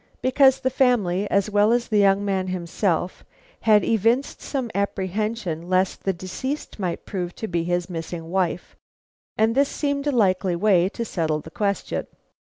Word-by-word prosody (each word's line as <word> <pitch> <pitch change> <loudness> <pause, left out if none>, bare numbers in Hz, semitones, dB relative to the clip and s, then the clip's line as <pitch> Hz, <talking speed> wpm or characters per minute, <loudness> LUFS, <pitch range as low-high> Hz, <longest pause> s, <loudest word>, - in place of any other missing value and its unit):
Because 265 +1 +4
the 260 0 0
family 205 -7 +2
as 200 +1 +1
well 205 +2 +4
as 240 0 +1
the 215 -2 +2
young 200 0 +3
man 190 -2 -1
himself 180 0 -2 0.4
had 210 -3 +4
evinced 230 +6 +1
some 260 -5 -3
apprehension 195 -3 -2
lest 185 0 0
the 195 - +3
deceased 200 - -5
might 180 -3 -3
prove 180 -3 -4
to 220 - -5
be 170 -3 -1
his 175 0 -1
missing 165 -1 -6
wife, 180 -2 -1 0.6
and 220 +1 +3
this 275 +2 +3
seemed 285 -1 -2
a - - +3
likely 190 -6 +2
way 185 -1 +3
to 230 +3 -5
settle 160 -6 -1
the 160 - -12
question." 200 0 -2
200 Hz, 160 wpm, -23 LUFS, 180-230 Hz, 0.6 s, Because